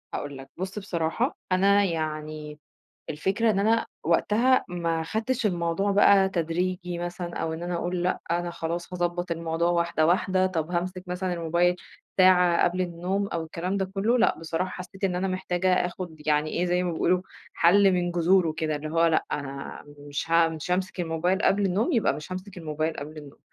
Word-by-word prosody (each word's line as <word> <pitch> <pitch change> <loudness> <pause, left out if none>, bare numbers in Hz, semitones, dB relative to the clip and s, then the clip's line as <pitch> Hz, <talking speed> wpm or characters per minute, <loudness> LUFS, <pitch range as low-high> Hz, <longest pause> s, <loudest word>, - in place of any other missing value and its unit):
هاقول 145 -1 -4
لك 135 0 -11
بُص 190 +3 -4
بصراحة، 190 - -1
أنا 200 +2 +4
يعني 155 -3 -4 0.5
الفكرة 195 +9 +1
إن 200 - +1
أنا 220 +3 +2 0.2
وقتها 225 +10 +3
ما 170 -2 -1
خدتش 220 +8 -1
الموضوع 175 +1 0
بقى 200 -1 +6
تدريجي 180 +1 -2
مثلًا، 175 0 -5
أو 165 0 -2
إن 160 +1 -6
أنا 175 0 -3
أقول 175 +1 -2
لأ، 180 - 0
أنا 175 +1 0
خلاص 170 +1 -4
هاضبّط 175 0 -2
الموضوع 165 +1 0
واحدة 170 -2 +1
واحدة، 185 +2 +2
طب 165 -3 -2
هامسك 180 +1 -2
مثلًا 180 +1 -2
الموبايل 175 +1 +1 0.4
ساعة 180 -2 +5
قبل 180 +1 0
النوم 180 +3 -1
أو 170 -4 -3
الكلام 175 +4 -3
ده 195 - 0
كلّه، 220 +5 +2
لأ - - +3
بصراحة 165 +3 -2
حسّيت 190 +2 -7
إن 185 -2 +1
أنا 190 +2 -1
محتاجة 185 0 0
آخد 175 -2 -7
يعني 150 0 +2
إيه 175 - 0
زي 180 +1 +1
ما 175 -1 -1
بيقولوا 180 +2 +1 0.3
حل 195 +3 +5
من 175 -1 0
جذوره 175 -1 +3
كده، 155 -1 -1
اللي 150 +1 -5
هو 165 +1 +3
لأ 165 -1 +2
أنا 140 -1 -5 0.3
مش 145 +3 -4
ه 165 0 +5
مش 160 +1 -6
هامسك 185 +1 -1
الموبايل 175 +3 0
قبل 200 0 +3
النوم، 195 +6 +1
يبقى 230 - +3
مش 150 +4 -8
هامسك 185 +1 -7
الموبايل 155 -1 -2
قبل 150 +2 -7
النوم، 145 -2 -12
175 Hz, 180 wpm, -26 LUFS, 165-185 Hz, 0.5 s, بقى